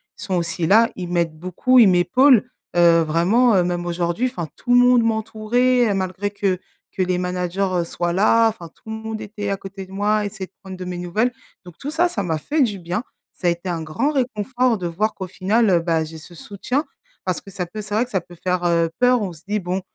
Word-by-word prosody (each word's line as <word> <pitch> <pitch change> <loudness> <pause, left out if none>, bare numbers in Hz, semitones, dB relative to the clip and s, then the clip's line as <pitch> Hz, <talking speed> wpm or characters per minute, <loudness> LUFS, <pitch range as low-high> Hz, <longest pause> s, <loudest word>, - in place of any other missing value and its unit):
sont 190 - -3
aussi 170 -1 -1
là, 225 +5 +5
ils 180 -2 -5
m'aident 170 -3 -1
beaucoup, 185 +10 +2
ils 220 -5 +8
m'épaulent, 235 +8 +4 0.3
heu, 170 -1 +6
vraiment, 185 +10 +3
heu, 180 - +4
même 175 0 -2
aujourd'hui, 175 +7 -1
enfin 245 -11 -5
tout 245 - -4
le 245 - +7
monde 245 -1 +5
m'entourait, 225 +2 +1
heu, - - +1
malgré 190 +1 -2
que 195 -3 -1 0.3
que 190 - -1
les 180 -1 0
managers, 180 +1 -2
heu, 180 -2 +1
soient 175 +1 -2
là, 225 +4 +4
enfin 195 -6 -8
tout 220 - -17
le 220 - -3
monde 220 0 -6
était 205 -1 -5
à 195 - -1
côté 195 0 -8
de 185 - -17
moi, 210 +2 +1
essayait 195 -2 -6
de - - -43
prendre 190 -1 -8
de 185 - -7
mes 180 0 -5
nouvelles, 180 +8 0 0.3
donc 175 -2 -13
tout 290 - -5
ça, 345 +3 +2
ça 205 - -3
m'a 165 -3 -1
fait 300 - 0
du 210 -5 -1
bien, 180 +6 -3 0.3
ça - - -10
a - - +5
été 170 +2 -5
un 165 -2 -2
grand 230 - -1
réconfort 250 -2 0
de 175 - -2
voir 210 +6 -1
qu'au 190 - -6
final, 200 +5 +1
heu, 175 -2 +4
bah, 165 -1 0
j'ai 160 +1 -9
ce 165 +3 -13
soutien 210 - -3 0.4
parce 185 -2 -1
que 195 - -13
ça 185 -2 -3
peut 215 +5 -7
c'est 210 0 -8
vrai 220 +3 +3
que 250 - -20
ça 190 - +1
peut 175 +1 -15
faire, 180 -1 0
heu, 170 -1 +2
peur 250 -1 +4
on 195 -3 -3
se 160 - -16
dit 210 +1 0
bon: 185 0 -3
195 Hz, 245 wpm, -21 LUFS, 175-225 Hz, 0.4 s, ils